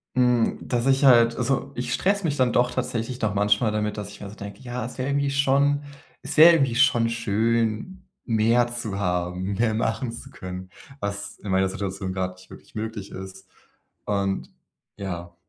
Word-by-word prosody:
Hm, 125 -2 +2
dass 120 -1 -1
ich 135 +1 +3
halt 120 -3 +6
also, 135 +2 -1
ich 120 0 -3
stresse 200 +6 +1
mich 150 -4 0
dann 125 -3 +2
doch 125 0 +3
tatsächlich 120 +1 -3
noch 110 -2 +1
manchmal 105 +2 +2
damit, 105 0 -2
dass 105 -1 -5
ich - - -13
mir 100 - -6
so 105 - -11
denke: 100 -1 -9
„Ja, 125 -2 -4
es 125 - -8
wäre 130 +2 -1
irgendwie 140 0 +1
schon 140 +1 +2 0.4
es - - -5
wäre 165 +2 +10
irgendwie 135 -7 +2
schon 115 -2 +4
schön, 115 - -1 0.2
mehr 115 +1 +3
zu 120 -4 -4
haben, 90 0 -1
mehr 115 +2 +1
machen 115 +2 -1
zu 115 - -10
können, 90 0 -8 0.3
was 100 0 -4
in 100 - -5
meiner 95 0 +3
Situation 95 -1 -4
gerade 95 -1 -2
nicht 95 0 -18
wirklich - - -14
möglich 110 -2 -5
ist.“ 95 0 -9 0.6
Und 100 -2 -1 0.5
ja, 85 -3 -6
115 Hz, 180 wpm, -24 LUFS, 100-125 Hz, 0.6 s, wäre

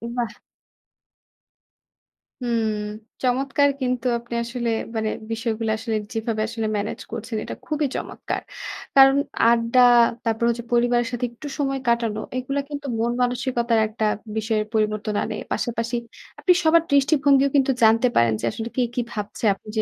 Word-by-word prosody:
বাহ্! 235 -3 -2 2.1
হুম। 230 -3 0 0.5
চমৎকার 270 +3 +2
কিন্তু 250 -1 -1
আপনি 235 0 -10
আসলে 235 0 -3 0.3
মানে 220 -1 0 0.2
বিষয়গুলো 225 0 -2
আসলে 225 0 -3 0.2
যেভাবে 225 -1 -2
আসলে 225 -1 -3
manage 205 - -4
করছেন 225 0 -4
এটা - - -6
খুবই 305 -2 0
চমৎকার। - - -4 0.5
কারণ 270 0 +8 0.3
আড্ডা 235 +1 +3 0.4
তারপর 225 -1 -1
হচ্ছে 235 0 -2
পরিবারের 240 0 +3
সাথে 245 0 -1
একটু 240 +5 -9
সময় 275 -2 -1
কাটানো, 230 -2 +1 0.2
এইগুলা 260 +2 -2
কিন্তু 290 -1 -5
মন 235 +1 +1
মানসিকতার 245 -2 +1
একটা 215 0 -2 0.3
বিষয়ের 220 -1 0
পরিবর্তন 215 -1 0
আনে। - - -4 0.2
পাশাপাশি 235 0 -2 0.4
আপনি 360 - +5
সবার 325 +1 +5
দৃষ্টিভঙ্গিও 280 -1 +4
কিন্তু 270 -1 +4
জানতে 225 +3 +5
পারেন 115 -1 +4
যে, - - -2
আসলে 225 +1 -5
কে 255 - +2
কী 245 - +1
ভাবছে। 210 0 -6
আপনি 195 - -18
যে - - +4
235 Hz, 140 wpm, -23 LUFS, 225-265 Hz, 2.1 s, কারণ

